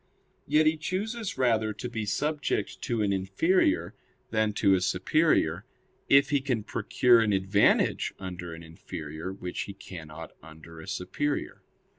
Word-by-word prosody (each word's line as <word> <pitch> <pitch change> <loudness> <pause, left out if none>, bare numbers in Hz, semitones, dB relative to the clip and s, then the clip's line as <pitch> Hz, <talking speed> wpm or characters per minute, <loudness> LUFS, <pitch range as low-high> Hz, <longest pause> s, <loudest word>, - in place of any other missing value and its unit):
Yet 150 +2 +4
he 155 +1 +3
chooses 205 +6 -3
rather 110 -4 +2
to 125 - -6
be 110 -3 -4
subject 150 +8 -1
to 115 -3 -1
an 100 -1 +1
inferior 95 - +1 0.4
than 110 -1 +1
to 100 -1 +3
a 95 - +2
superior, 95 - +2 0.5
if 140 +1 +5
he 140 -2 +2
can 125 -6 -1
procure 120 +2 +3
an 105 -2 +1
advantage 95 +1 +2
under 90 -3 -7
an 80 - -11
inferior 80 +1 -7
which 90 -2 -5
he - - -5
cannot 80 -2 -9
under 80 0 -13
a 80 - -11
superior. 140 +10 -3
105 Hz, 145 wpm, -28 LUFS, 90-140 Hz, 0.5 s, if